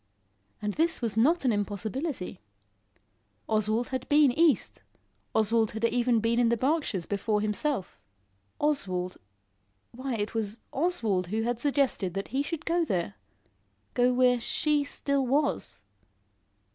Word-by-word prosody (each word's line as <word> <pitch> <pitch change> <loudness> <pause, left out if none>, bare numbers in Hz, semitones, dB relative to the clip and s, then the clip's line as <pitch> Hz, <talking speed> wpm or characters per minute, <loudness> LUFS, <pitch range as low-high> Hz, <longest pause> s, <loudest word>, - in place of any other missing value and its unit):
And 210 0 -1
this 330 +6 +1
was 230 -4 -2
not 285 +8 +3
an 250 - +4
impossibility. 210 - -3 1.1
Oswald 215 +2 +1
had 260 -1 -4
been 295 -2 +6
east, 305 -2 +2 0.5
Oswald 220 0 +2
had 220 +1 -1
even 240 0 +2
been 230 +2 +1
in 240 -1 +4
the 235 - +2
Berkshires 260 - 0
before 210 +2 0
himself. 215 +1 -1 0.6
Oswald 185 -12 -1 0.7
Why 255 +1 -4
it 210 0 -3
was 220 0 -3
Oswald 230 - +1
who 220 +4 -1
had 240 0 -1
suggested 265 - 0
that 195 - -3
he 265 +4 0
should 315 +1 -4
go 340 +1 +2
there 175 - -1 0.8
go 245 0 +3
where 250 -1 +3
she 295 +4 +1
still 280 -1 -1
was. 280 - 0
235 Hz, 135 wpm, -28 LUFS, 210-285 Hz, 1.1 s, been